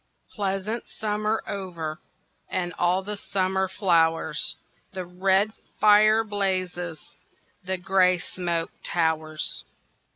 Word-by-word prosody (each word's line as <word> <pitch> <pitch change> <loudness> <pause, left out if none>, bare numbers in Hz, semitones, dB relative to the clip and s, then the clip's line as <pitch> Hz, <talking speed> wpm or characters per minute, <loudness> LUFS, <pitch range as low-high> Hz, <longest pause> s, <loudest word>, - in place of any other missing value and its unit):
Pleasant 200 +3 -2
summer 215 0 -1
over 175 -5 -5 0.5
And 175 -1 -1
all 180 +2 +2
the 210 +1 -4
summer 190 -1 0
flowers, 170 -4 +2 0.4
The 185 -1 -4
red 190 +4 +2 0.3
fire 215 +1 +6
blazes, 185 -5 -2 0.6
The 185 +1 -2
grey 185 0 +3
smoke 170 -1 -3
towers. 160 -2 -1
185 Hz, 95 wpm, -26 LUFS, 175-200 Hz, 0.6 s, fire